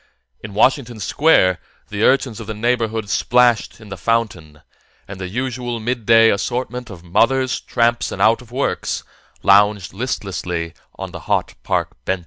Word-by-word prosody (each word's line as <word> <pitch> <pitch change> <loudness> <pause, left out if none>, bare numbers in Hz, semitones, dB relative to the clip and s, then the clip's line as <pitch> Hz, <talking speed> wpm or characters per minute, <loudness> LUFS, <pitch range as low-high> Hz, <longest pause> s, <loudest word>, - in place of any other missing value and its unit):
In 105 -2 -8
Washington 120 0 +2
Square, 100 - +3 0.3
the 105 0 -4
urchins 130 -4 +2
of 110 - -8
the 110 - -4
neighborhood 115 -1 -1
splashed 120 +2 +2
in 110 -2 -13
the 95 - -7
fountain, 90 -7 -2 0.4
and 95 -1 -9
the 95 - -4
usual 120 +1 -3
midday 115 -1 +4
assortment 125 +3 -3
of 90 -5 -11
mothers, 130 +9 +1
tramps 120 0 0
and - - -6
out 115 +3 +4
of 120 -1 -16
works 135 +3 -2 0.4
lounged 100 -1 +4
listlessly 90 -7 -4 0.2
on - - -7
the - - -8
hot - - 0
park 60 - -2
benches. 95 +6 -1
115 Hz, 150 wpm, -19 LUFS, 100-125 Hz, 0.4 s, midday